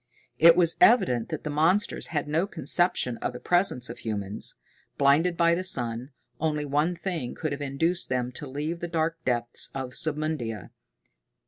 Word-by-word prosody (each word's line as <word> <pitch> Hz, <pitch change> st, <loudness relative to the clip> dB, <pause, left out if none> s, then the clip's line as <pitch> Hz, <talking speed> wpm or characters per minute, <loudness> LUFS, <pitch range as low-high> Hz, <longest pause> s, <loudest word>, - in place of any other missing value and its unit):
It 165 Hz, +1 st, +8 dB
was 170 Hz, -2 st, +2 dB
evident 185 Hz, -, +4 dB
that -, -, -5 dB
the 150 Hz, -, -3 dB
monsters 165 Hz, +8 st, +1 dB
had 150 Hz, -3 st, -2 dB
no 160 Hz, +6 st, 0 dB
conception 175 Hz, -, +1 dB
of -, -, -3 dB
the 125 Hz, -, -7 dB
presence 175 Hz, -8 st, +2 dB
of 120 Hz, -, -8 dB
humans. 105 Hz, -2 st, -4 dB, 0.4 s
Blinded 155 Hz, +5 st, +3 dB
by 170 Hz, 0 st, +4 dB
the 180 Hz, +2 st, -1 dB
sun, 120 Hz, -7 st, -2 dB, 0.3 s
only 150 Hz, -1 st, -1 dB
one 150 Hz, +5 st, 0 dB
thing 170 Hz, -8 st, -4 dB
could 155 Hz, -, -3 dB
have 140 Hz, +1 st, -4 dB
induced 165 Hz, +6 st, -1 dB
them 125 Hz, -1 st, -1 dB
to 140 Hz, +3 st, -6 dB
leave 150 Hz, +5 st, -4 dB
the 175 Hz, -, -4 dB
dark 165 Hz, 0 st, -2 dB
depths 120 Hz, -1 st, 0 dB
of 130 Hz, -2 st, -5 dB
Submundia. 150 Hz, -8 st, -3 dB
150 Hz, 165 wpm, -26 LUFS, 125-170 Hz, 0.4 s, It